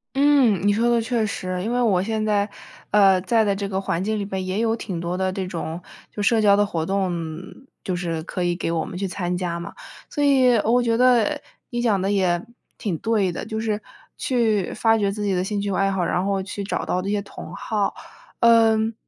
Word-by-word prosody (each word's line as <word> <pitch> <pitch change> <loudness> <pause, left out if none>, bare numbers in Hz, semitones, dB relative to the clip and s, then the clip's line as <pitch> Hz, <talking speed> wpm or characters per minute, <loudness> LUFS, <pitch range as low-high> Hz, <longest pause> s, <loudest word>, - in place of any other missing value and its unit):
嗯， 275 -8 +4
你 - - +5
说 230 +3 +1
的 235 -1 +3
确 230 -1 0
实。 185 -3 -3
因 225 +4 -2
为 245 - +1
我 200 -7 +3
现 220 +1 -1
在， 205 -1 +1 0.4
呃， 195 -2 +5
在 225 +4 +2
的 200 -2 +1
这 200 0 -3
个 195 -1 -2
环 180 -2 -2
境 215 +1 -1
里 - - -2
边 190 -1 -4
也 185 +2 -2
有 225 0 +1
挺 195 -6 -5
多 175 +1 -3
的 190 0 -1
这 190 -1 -3
种 170 -1 -5 0.3
就 210 - -5
社 225 +3 +3
交 205 -2 +5
的 205 - +3
活 165 -5 -2
动 195 0 0 0.7
就 185 - -2
是 170 -2 -3
可 180 +2 -4
以 175 0 +1
给 170 -1 -2
我 165 -1 -1
们 - - -8
去 195 +1 -2
参 180 -1 -3
加 175 -1 -2
嘛， 170 - -7 0.4
所 290 - -1
以 260 -3 +5
我 240 +3 +3
觉 230 -1 +1
得， 255 +4 +3 0.3
你 240 -1 -1
讲 220 -5 +2
得 195 +2 0
也 185 -3 +2 0.4
挺 195 -6 -2
对 210 -5 +1
的， - - -5
就 220 0 -4
是 215 -1 -1 0.3
去 220 -7 0
发 225 0 +3
掘 200 -1 +1
自 210 +1 -4
己 200 - +1
的 180 0 0
兴 205 +1 -2
趣 200 -1 -2
爱 195 +1 +1
好， 190 -2 0
然 180 - 0
后 195 -1 -1
去 200 +1 -5
找 195 - -3
到 180 - -1
这 195 - -4
些 205 0 +1
同 200 - -10
好。 210 -2 -1 0.5
嗯， 225 -1 +4
200 Hz, 245 characters per minute, -23 LUFS, 185-225 Hz, 0.7 s, 你